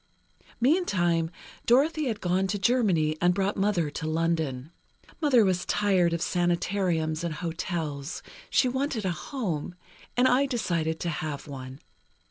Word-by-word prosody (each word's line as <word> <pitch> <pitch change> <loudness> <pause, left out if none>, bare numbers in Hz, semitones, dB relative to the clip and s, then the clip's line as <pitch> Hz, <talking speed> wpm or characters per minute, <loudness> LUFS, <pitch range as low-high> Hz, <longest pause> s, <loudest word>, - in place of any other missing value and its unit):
"Meantime, 185 - +2 0.4
Dorothy 290 +5 +3
had 220 -4 -3
gone 185 +2 +1
to 205 - -1
Germany 190 -9 +2
and 175 0 +4
brought 200 +1 0
Mother 195 -6 +1
to 155 - -4
London. 160 -4 -1 0.5
Mother 255 -8 +5
was 180 -2 +1
tired 190 -4 +2
of 170 0 -1
sanatoriums 175 -2 0
and 170 -3 -2
hotels. 160 -3 -4 0.3
She 260 - +3
wanted 260 -4 -1
a 185 - +1
home, 175 - -4 0.4
and 250 +1 +5
I 270 +3 +3
decided 170 - -1
to 170 - -1
have 150 -2 -4
one. 130 -1 -8
175 Hz, 135 wpm, -27 LUFS, 160-215 Hz, 0.5 s, Mother